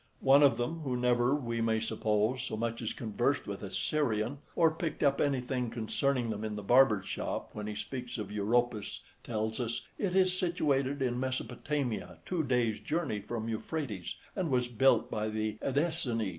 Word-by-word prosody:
One 135 Hz, +2 st, +7 dB
of 140 Hz, -5 st, +6 dB
them, 125 Hz, +8 st, -2 dB
who 130 Hz, -5 st, -2 dB
never, 125 Hz, +2 st, +3 dB
we 115 Hz, -5 st, -2 dB
may 110 Hz, -1 st, +2 dB
suppose, 110 Hz, +2 st, 0 dB
so 120 Hz, -4 st, -4 dB
much 115 Hz, +1 st, -2 dB
as 115 Hz, -, -2 dB
conversed 120 Hz, +5 st, 0 dB
with 100 Hz, -1 st, -5 dB
a 100 Hz, -, -5 dB
Syrian, 125 Hz, -2 st, 0 dB, 0.2 s
or 165 Hz, -2 st, +5 dB
picked 160 Hz, -1 st, -3 dB
up 140 Hz, -1 st, +3 dB
anything 130 Hz, -3 st, 0 dB
concerning 120 Hz, +2 st, 0 dB
them 105 Hz, 0 st, -4 dB
in 110 Hz, -1 st, -3 dB
the 105 Hz, -, -5 dB
barbers' 120 Hz, -3 st, +5 dB
shop, -, -, -3 dB
when 105 Hz, 0 st, -5 dB
he 105 Hz, -, -4 dB
speaks 125 Hz, +2 st, -5 dB
of 105 Hz, -2 st, -5 dB
Europus, 110 Hz, +2 st, 0 dB, 0.2 s
tells 110 Hz, 0 st, -2 dB
us, 120 Hz, -1 st, -2 dB
"it 190 Hz, -3 st, 0 dB
is 185 Hz, -1 st, +4 dB
situated 145 Hz, -6 st, +1 dB
in 125 Hz, -1 st, 0 dB
Mesopotamia, 130 Hz, -1 st, -2 dB
two 180 Hz, -3 st, 0 dB
days' 120 Hz, -5 st, +1 dB
journey 150 Hz, -10 st, -1 dB
from 110 Hz, +2 st, -4 dB
Euphrates, 115 Hz, -, -3 dB, 0.2 s
and 185 Hz, -5 st, -1 dB
was 125 Hz, -2 st, +2 dB
built 120 Hz, -1 st, +3 dB
by 110 Hz, 0 st, -1 dB
the 110 Hz, 0 st, -2 dB
Edessenes." 135 Hz, -, 0 dB
120 Hz, 175 wpm, -31 LUFS, 110-140 Hz, 0.2 s, One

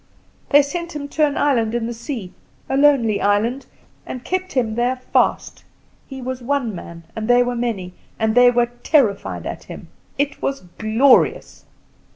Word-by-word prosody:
They 290 Hz, 0 st, +6 dB
sent 340 Hz, +3 st, -5 dB
him 285 Hz, -1 st, -4 dB
to 305 Hz, +1 st, +2 dB
an 290 Hz, -, -4 dB
island 235 Hz, -6 st, +1 dB
on 235 Hz, -1 st, -1 dB
the 235 Hz, -, -4 dB
sea, 230 Hz, -, -6 dB, 0.3 s
a -, -, -1 dB
lonely 270 Hz, -7 st, +3 dB
island, 220 Hz, +6 st, 0 dB, 0.4 s
and 255 Hz, -, -7 dB
kept 370 Hz, 0 st, -3 dB
him 235 Hz, -5 st, 0 dB
there 240 Hz, +3 st, 0 dB
fast. 255 Hz, -, -1 dB, 0.4 s
He 265 Hz, -2 st, -8 dB
was 255 Hz, 0 st, -4 dB
one 250 Hz, -3 st, -1 dB
man, 170 Hz, -2 st, -9 dB
and 220 Hz, -1 st, -4 dB
they 245 Hz, 0 st, +5 dB
were 245 Hz, 0 st, -2 dB
many, 220 Hz, -7 st, -3 dB, 0.2 s
and 220 Hz, -1 st, +1 dB
they 245 Hz, +1 st, +7 dB
were 240 Hz, -1 st, +1 dB
terrified 245 Hz, -11 st, +1 dB
at -, -, -6 dB
him. -, -, -10 dB, 0.3 s
It 285 Hz, +1 st, -1 dB
was 275 Hz, 0 st, -2 dB, 0.2 s
glorious!" 225 Hz, +5 st, +2 dB
245 Hz, 170 wpm, -20 LUFS, 225-280 Hz, 0.4 s, they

